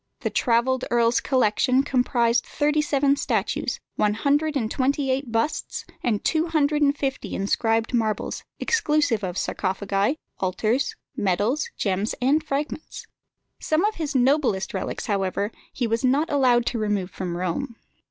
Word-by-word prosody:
The - - -2
travelled 250 +2 +2
earl's 235 0 +3
collection 255 +1 +2
comprised 245 -3 +2
thirty 300 +1 +1
seven 280 -2 +2
statues, - - -1 0.2
one 210 0 +2
hundred 290 +5 +1
and 220 -4 -2
twenty 270 +1 +1
eight 260 -2 -2
busts, 230 +7 -1 0.2
and 220 -4 -1
two 320 +1 +2
hundred 300 -2 +1
and 285 0 +3
fifty 270 -2 -3
inscribed 225 +4 0
marbles, 220 -3 -1 0.2
exclusive 300 - +1
of 180 -1 -3
sarcophagi, 195 +6 -1 0.2
altars, 215 +8 0 0.2
medals, 205 - 0
gems, 195 +1 -1
and 280 +5 +2
fragments. 300 +1 -4 0.5
Some 315 +5 +1
of 430 - +1
his 305 -2 -3
noblest 255 -7 +2
relics, - - -3
however, 200 +1 -1 0.2
he 250 - -2
was 230 +2 -1
not 275 +5 +2
allowed 250 -4 +3
to 235 - -1
remove 205 -3 -1
from 175 -2 -4
Rome. 205 +8 -3
250 Hz, 145 wpm, -24 LUFS, 215-285 Hz, 0.5 s, earl's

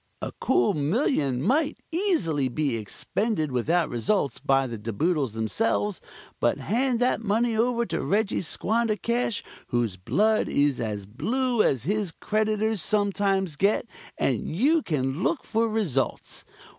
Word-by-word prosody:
A - - -4
cool 220 - +3
million 145 - 0
might 285 - +1
easily 205 - +1
be 140 -1 -1
expended 155 - -2
without 155 +7 +1
results, 140 - 0
by 135 0 +2
the 115 -4 -6
De 115 +2 -4
Boodles 145 - 0
themselves, 195 - -1 0.4
but - - +2
hand 245 +1 0
that 250 -2 +2
money 225 +2 +1
over 235 +1 +1
to - - -2
Reggie 210 +1 +1
Squandercash, 230 +4 0 0.2
whose 115 -6 -1
blood 215 - +1
is 145 -2 +2
as 105 -3 -3
blue 240 - 0
as 130 - +1
his 200 +2 -1
creditors 215 +1 0
sometimes 195 -3 +1
get, 200 +9 +2 0.3
and 125 -6 0
you 300 - +3
can 140 - -2
look 335 - 0
for 230 0 0
results. 160 - -2
200 Hz, 135 wpm, -26 LUFS, 135-225 Hz, 0.4 s, cool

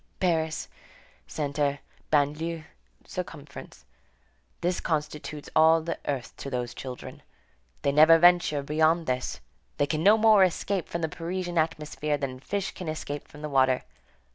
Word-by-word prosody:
Paris, 160 -3 0 0.6
centre, 145 - -1 0.3
banlieue, 155 +2 0 0.4
circumference; 60 - -8 0.8
this 180 +1 0
constitutes 150 -1 -3
all 160 +1 +6
the 165 +1 -4
earth 135 -4 -3
to 140 - -6
those 125 -2 -3
children. 130 -2 -8 0.6
They 140 - +2
never 155 +3 +7
venture 175 -4 +4
beyond 160 +3 +2
this. 125 0 -2 0.4
They 145 - +3
can 155 +1 -2
no 205 +5 +6
more 215 -3 +6
escape 185 +1 -1
from 170 - -3
the 160 - +1
Parisian 175 +2 -3
atmosphere 150 -2 -1
than 135 -2 -4
fish 200 +7 -3
can 180 - -8
escape 145 -2 -5
from 150 +1 -13
the 150 - -3
water. 130 -2 +3
155 Hz, 140 wpm, -27 LUFS, 145-170 Hz, 0.8 s, never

